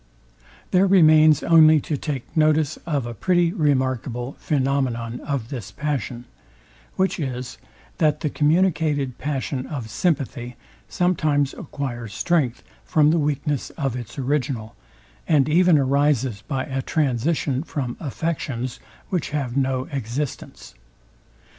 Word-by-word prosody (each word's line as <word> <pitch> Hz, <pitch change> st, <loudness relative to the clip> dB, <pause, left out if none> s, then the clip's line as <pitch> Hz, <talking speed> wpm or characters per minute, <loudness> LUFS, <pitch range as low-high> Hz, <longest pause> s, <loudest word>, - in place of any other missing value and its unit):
There 185 Hz, +2 st, +4 dB
remains 155 Hz, -5 st, +6 dB
only 160 Hz, -2 st, +6 dB
to 150 Hz, -, -2 dB
take 140 Hz, -3 st, -5 dB
notice 155 Hz, -1 st, +2 dB
of 145 Hz, -6 st, 0 dB
a 120 Hz, -, -5 dB
pretty 175 Hz, -, +1 dB
remarkable 130 Hz, -, -1 dB
phænomenon 130 Hz, -5 st, 0 dB
of 140 Hz, -6 st, -3 dB
this 120 Hz, -9 st, -6 dB
passion; 130 Hz, -5 st, -3 dB, 0.7 s
which 190 Hz, 0 st, 0 dB
is, 125 Hz, -3 st, -4 dB, 0.4 s
that 150 Hz, -2 st, +2 dB
the 155 Hz, -, 0 dB
communicated 150 Hz, -5 st, +1 dB
passion 135 Hz, -2 st, -3 dB
of 125 Hz, -8 st, -6 dB
sympathy 125 Hz, -, -1 dB, 0.3 s
sometimes 155 Hz, -6 st, +1 dB
acquires 120 Hz, -7 st, -6 dB
strength 145 Hz, -9 st, 0 dB, 0.2 s
from 150 Hz, -1 st, +3 dB
the 165 Hz, -, +2 dB
weakness 145 Hz, -1 st, -1 dB
of 135 Hz, -6 st, -1 dB
its 120 Hz, 0 st, -7 dB
original, 130 Hz, -4 st, -2 dB, 0.5 s
and 150 Hz, -4 st, +3 dB
even 175 Hz, +1 st, +5 dB
arises 135 Hz, -5 st, +1 dB
by 135 Hz, -2 st, -1 dB
a 135 Hz, -3 st, -3 dB
transition 140 Hz, 0 st, 0 dB
from 140 Hz, -7 st, -4 dB
affections, 135 Hz, -5 st, -3 dB, 0.3 s
which 180 Hz, -4 st, -1 dB
have 140 Hz, -5 st, -3 dB
no 130 Hz, -1 st, 0 dB
existence. 135 Hz, +1 st, -5 dB
140 Hz, 120 wpm, -23 LUFS, 125-155 Hz, 0.7 s, remains